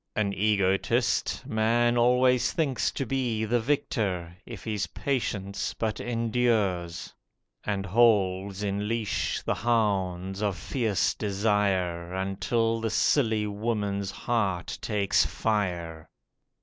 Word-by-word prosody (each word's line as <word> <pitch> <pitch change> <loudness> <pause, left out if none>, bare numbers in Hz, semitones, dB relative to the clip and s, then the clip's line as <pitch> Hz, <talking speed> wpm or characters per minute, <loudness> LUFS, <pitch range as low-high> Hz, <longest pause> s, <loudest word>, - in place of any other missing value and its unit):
(An 100 -2 0
egotist, 105 +6 +1
man 120 0 +2
always 125 +1 +3
thinks 140 -6 0
to 135 - -3
be 120 -4 -1
The 120 +3 +1
victor, 105 - -1
if 115 -4 -8
his 105 -5 -2
patience 100 -4 -2
but 110 -2 -2
endures, 110 -8 0 0.5
And 100 -2 -2
holds 100 -2 +2
in 100 +1 -1
leash 115 -2 -1
the - - 0
hounds 95 -5 0
of 100 -4 0
fierce 110 -6 0
desire, 95 -4 0
Until 105 +4 0
the 115 - -1
silly 110 -2 +2
woman's 105 -2 -2
heart 100 -6 -1
takes 100 -2 +2
fire.) 90 -7 -2
105 Hz, 110 wpm, -27 LUFS, 95-115 Hz, 0.5 s, always